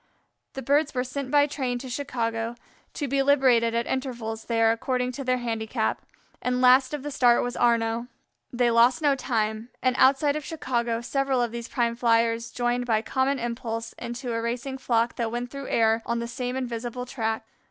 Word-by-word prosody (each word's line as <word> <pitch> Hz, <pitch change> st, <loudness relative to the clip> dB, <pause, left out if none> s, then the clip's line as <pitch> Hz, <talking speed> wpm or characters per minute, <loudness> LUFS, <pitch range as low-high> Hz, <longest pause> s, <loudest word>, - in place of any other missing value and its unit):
The 270 Hz, -, -6 dB
birds 285 Hz, +3 st, +2 dB
were 250 Hz, -, +1 dB
sent 260 Hz, +1 st, -5 dB
by 290 Hz, +1 st, +5 dB
train 265 Hz, -4 st, -2 dB
to 260 Hz, +2 st, -8 dB
Chicago, 235 Hz, -3 st, -2 dB, 0.4 s
to 290 Hz, -, -2 dB
be 275 Hz, +1 st, +1 dB
liberated 255 Hz, -5 st, +4 dB
at 235 Hz, 0 st, 0 dB
intervals 240 Hz, -4 st, -4 dB
there 225 Hz, -1 st, +3 dB
according 250 Hz, +2 st, -1 dB
to 275 Hz, +2 st, -6 dB
their 255 Hz, -1 st, +1 dB
handicap, 225 Hz, -2 st, -2 dB, 0.4 s
and 250 Hz, 0 st, 0 dB
last 255 Hz, +1 st, +5 dB
of 285 Hz, -, -7 dB
the 295 Hz, -, -4 dB
start 245 Hz, -3 st, +4 dB
was 245 Hz, 0 st, -3 dB
Arnaux. 230 Hz, 0 st, +1 dB, 0.4 s
They 240 Hz, -1 st, +2 dB
lost 240 Hz, +7 st, +4 dB
no 290 Hz, -1 st, +5 dB
time, 220 Hz, -3 st, -2 dB
and 255 Hz, -1 st, +1 dB
outside 280 Hz, +2 st, +4 dB
of 305 Hz, -, -3 dB
Chicago 240 Hz, -7 st, -2 dB
several 270 Hz, +1 st, 0 dB
of 240 Hz, -2 st, 0 dB
these 235 Hz, 0 st, -6 dB
prime 235 Hz, -2 st, 0 dB
Flyers 230 Hz, -1 st, +2 dB
joined 245 Hz, +1 st, -1 dB
by 220 Hz, -2 st, +2 dB
common 265 Hz, +3 st, 0 dB
impulse 230 Hz, -1 st, -4 dB
into 240 Hz, +1 st, -4 dB
a 230 Hz, -, -1 dB
racing 245 Hz, +3 st, -3 dB
flock 235 Hz, -2 st, 0 dB
that 230 Hz, -2 st, -1 dB
went 240 Hz, +1 st, -4 dB
through 275 Hz, -1 st, -7 dB
air 225 Hz, 0 st, +2 dB
on 235 Hz, -, 0 dB
the 235 Hz, 0 st, -3 dB
same 250 Hz, +1 st, -4 dB
invisible 245 Hz, -1 st, -4 dB
track. 225 Hz, -3 st, -2 dB
245 Hz, 185 wpm, -26 LUFS, 230-265 Hz, 0.4 s, by